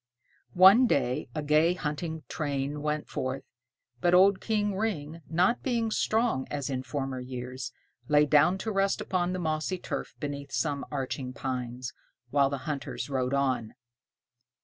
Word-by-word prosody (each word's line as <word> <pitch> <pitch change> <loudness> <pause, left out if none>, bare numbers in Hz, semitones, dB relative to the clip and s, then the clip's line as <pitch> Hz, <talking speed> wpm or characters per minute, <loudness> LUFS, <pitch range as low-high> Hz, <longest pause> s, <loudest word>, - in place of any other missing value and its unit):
One 200 +8 +8
day 125 - 0
a 155 - -2
gay 155 +4 +4
hunting 160 0 -4
train 145 -1 -2
went 150 0 -2
forth, 130 +1 -3 0.6
but 175 +6 +4
old 190 +1 +5
King 210 -3 0
Ring, 165 -7 -3
not 180 +8 +2
being 230 -4 0
strong, 220 - +1
as 140 -1 -3
in 130 -1 -1
former 135 -1 -3
years, 125 0 -6 0.4
lay 150 0 +5
down 150 +5 +4
to 220 - -1
rest 195 -1 +1
upon 180 -1 0
the 185 - -2
mossy 160 +1 -1
turf - - -5
beneath 140 -1 -5
some 145 -3 -1
arching 135 -2 -3
pines, 125 -2 -4 0.4
while 140 -1 +4
the 140 0 -5
hunters 145 -1 -4
rode 130 0 0
on. 130 -5 0
150 Hz, 150 wpm, -29 LUFS, 135-180 Hz, 0.6 s, One